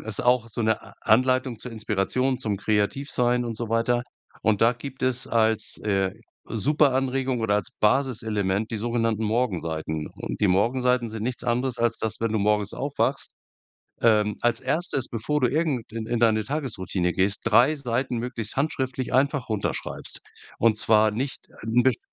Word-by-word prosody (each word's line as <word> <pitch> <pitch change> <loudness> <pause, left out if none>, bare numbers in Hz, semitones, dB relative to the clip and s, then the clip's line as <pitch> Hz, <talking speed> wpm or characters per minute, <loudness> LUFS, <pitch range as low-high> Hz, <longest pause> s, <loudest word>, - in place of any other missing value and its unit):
ist 110 -2 +1
auch 125 -2 +2
so 115 - -6
'ne 110 0 +1
A - - -14
Anleitung 130 +1 +2
zur 125 +1 -8
Inspiration, 115 +5 -1
zum 110 -5 -2
kreativ 105 +7 0
sein 120 0 +1
und 115 -2 -4
so 115 0 -4
weiter. 115 +2 +1 0.4
Und 110 -2 +2
da 115 +2 +5
gibt 130 +2 -9
es 130 0 +2
als, 110 -1 +1
äh, 95 -2 +1 0.3
super 145 +5 +2
Anregung 130 -1 0
oder 110 -2 +1
als 105 -3 -1
Basiselement 110 -4 +1
die 115 - -2
sogenannten 115 -1 -1
„Morgenseiten“. 80 -9 -2
Und - - -6
die 105 - +3
„Morgenseiten“ 120 +5 +2
sind 110 -1 -5
nichts 125 +1 0
anderes, 125 +1 0
als 120 0 +1
das, 110 -1 -2
wenn 115 -1 0
du 110 - +1
morgens 105 0 +1
aufwachst. 140 +1 -1 0.7
Ähm, 105 -2 +3
als 120 0 +1
Erstes, 135 -1 -1
bevor 145 +6 -2
du 125 - +4
irgend 140 -5 -1
in 110 -1 -5
in 120 - 0
deine 110 -2 +3
Tagesroutine 100 - -2
gehst, 100 +3 +3
3 130 +6 +4
Seiten 125 -2 -2
möglichst 115 -2 -2
handschriftlich 130 -3 -2
einfach 135 -3 +1
runter 105 -2 -1
schreibst. - - -2 0.4
Und 110 -1 +3
zwar 110 0 +3
nicht 130 +5 -3 0.2
'n 120 +2 +3
best 130 -4 +2
115 Hz, 170 wpm, -25 LUFS, 110-130 Hz, 0.7 s, da